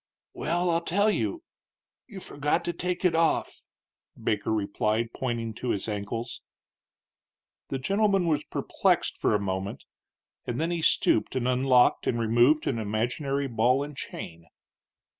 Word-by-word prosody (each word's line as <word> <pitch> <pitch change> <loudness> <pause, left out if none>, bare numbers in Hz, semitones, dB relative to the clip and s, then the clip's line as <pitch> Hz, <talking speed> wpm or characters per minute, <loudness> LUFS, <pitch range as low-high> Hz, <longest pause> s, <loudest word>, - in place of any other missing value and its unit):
"Well, 175 +2 0
I'll 165 0 +1
tell 200 +5 +2
you. 335 +10 -2 0.6
You 200 -6 -9
forgot 150 +3 -1
to 175 - -1
take 180 +2 -3
it 180 - +4
off," 165 0 0 0.5
Baker 105 0 -1
replied, 110 +2 0
pointing 120 -3 -3
to 125 +3 -5
his 100 -1 -1
ankles. 115 +3 -4 1.3
The 135 - -2
gentleman 195 +5 +2
was 150 -3 +1
perplexed - - 0
for - - +2
a - - +2
moment, 95 0 -4 0.6
and 120 +2 -2
then 165 +2 0
he 170 -1 -1
stooped 110 - +2
and 125 -1 0
unlocked 125 0 +3
and 120 - +1
removed 120 +7 +3
an 115 - -1
imaginary 125 +7 -1
ball 125 +3 +2
and 145 0 -8
chain. 85 -9 -8
130 Hz, 140 wpm, -27 LUFS, 110-165 Hz, 1.3 s, it